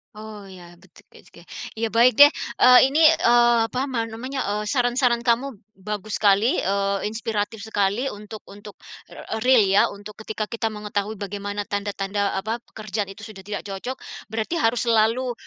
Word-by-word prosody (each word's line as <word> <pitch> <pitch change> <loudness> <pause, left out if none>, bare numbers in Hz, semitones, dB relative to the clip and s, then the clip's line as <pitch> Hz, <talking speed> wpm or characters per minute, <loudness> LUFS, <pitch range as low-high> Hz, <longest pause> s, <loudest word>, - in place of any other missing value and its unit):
Oh, 215 -1 -10
ya. 175 -2 -14
Bet - - -23
oke - - -21
oke. - - -17 0.3
Iya, 225 0 -2
baik 235 +3 +4
deh. 290 - +11 0.3
Eee, 250 0 +8
ini, 285 +4 +1
eee, 240 -7 +5
apa 255 +4 -3
man 230 -3 -1
namanya, 255 +3 -4
eee, 210 +1 -2
saran-saran 245 -2 +1
kamu 245 +1 0 0.2
bagus 210 +2 -5
sekali, 205 +4 +3
eee, 200 +1 -1
inspiratif 220 -1 -4
sekali 205 +3 0
untuk 210 +1 -10
untuk, 205 +1 -13 0.3
r 220 0 -7
real 250 -4 +5
ya. 195 +1 +4
Untuk 205 +1 -10
ketika 215 0 -4
kita 225 0 -3
mengetahui 210 0 -4
bagaimana 205 +1 -5
tanda-tanda, 200 0 -2
eee, 195 - -4
apa, 225 +2 -3
pekerjaan 210 -3 -5
itu 215 +2 -10
sudah 200 -3 -11
tidak 205 +1 -6
cocok. 205 +6 -6 0.3
Berarti 220 +7 -3
harus 230 +2 +1
selalu, 230 +3 +2
215 Hz, 165 wpm, -23 LUFS, 205-235 Hz, 0.3 s, deh